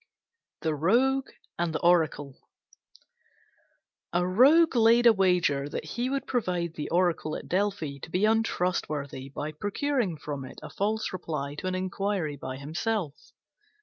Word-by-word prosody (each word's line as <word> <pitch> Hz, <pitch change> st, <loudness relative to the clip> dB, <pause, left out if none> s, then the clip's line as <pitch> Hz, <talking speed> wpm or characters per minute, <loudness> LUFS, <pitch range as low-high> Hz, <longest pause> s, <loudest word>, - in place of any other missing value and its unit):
THE 160 Hz, -1 st, 0 dB
ROGUE 250 Hz, -, +2 dB, 0.3 s
AND 170 Hz, -2 st, -1 dB
THE -, -, -2 dB
ORACLE 160 Hz, -5 st, +2 dB, 1.8 s
A 175 Hz, +1 st, +1 dB
Rogue 275 Hz, -, +5 dB
laid 235 Hz, +1 st, +5 dB
a 235 Hz, -, +8 dB
wager 175 Hz, -8 st, +2 dB
that -, -, -5 dB
he 240 Hz, +10 st, -2 dB
would 275 Hz, 0 st, -2 dB
prove 245 Hz, -4 st, -1 dB
the 170 Hz, -4 st, -3 dB
Oracle 170 Hz, -3 st, +1 dB
at -, -, -7 dB
Delphi 185 Hz, -7 st, -1 dB
to 160 Hz, -, -9 dB
be 185 Hz, +5 st, +1 dB
untrustworthy 175 Hz, -11 st, -1 dB
by 150 Hz, +2 st, -5 dB
procuring 205 Hz, -, -1 dB
from 145 Hz, -2 st, -5 dB
it 130 Hz, -, -10 dB
a -, -, -8 dB
false 215 Hz, +1 st, -1 dB
reply 150 Hz, -6 st, -4 dB
to -, -, -4 dB
an 185 Hz, -, -1 dB
inquiry 185 Hz, -3 st, -2 dB
by 130 Hz, -1 st, -6 dB
himself. 160 Hz, +3 st, -2 dB
180 Hz, 145 wpm, -28 LUFS, 155-220 Hz, 1.8 s, a